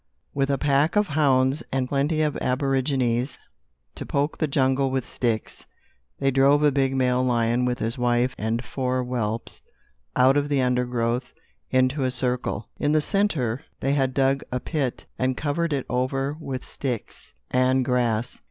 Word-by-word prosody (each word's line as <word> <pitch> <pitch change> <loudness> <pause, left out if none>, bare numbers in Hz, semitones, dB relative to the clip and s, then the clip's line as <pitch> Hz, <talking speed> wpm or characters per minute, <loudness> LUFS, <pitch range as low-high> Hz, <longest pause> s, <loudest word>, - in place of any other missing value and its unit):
With 135 0 0
a 140 - +2
pack 145 +5 +2
of 210 -1 +2
hounds 135 -1 +2
and 130 -1 0
plenty 145 +4 +1
of 150 -2 0
aborigines 130 -1 0 0.6
to - - -7
poke 145 +2 -1
the 155 - +1
jungle 135 -1 +2
with 130 -2 -1
sticks, 115 -3 -2 0.5
they 135 - +1
drove 140 +3 +4
a 150 - +5
big 135 -1 +1
male 125 -1 +2
lion, 120 0 +1
with 125 0 0
his 115 +3 -3
wife 120 +1 +2
and 115 +3 -2
four 130 +1 -1
whelps, 115 -3 -3 0.5
out 130 +2 +5
of 145 0 0
the 145 -2 +2
undergrowth 125 -1 0 0.4
into 130 +2 +2
a 130 - +1
circle. 125 -4 -2
In 145 0 +1
the 155 - +4
centre, 150 - 0 0.2
they 135 +1 0
had 135 -2 0
dug 135 0 +2
a 125 - -1
pit 135 -3 -3
and 130 0 0
covered 160 +3 -1
it 140 -3 -1
over 135 +3 -1
with 135 -5 -5
sticks 125 - -5 0.2
and 130 0 +2
grass. 120 -2 0
130 Hz, 160 wpm, -24 LUFS, 125-140 Hz, 0.6 s, a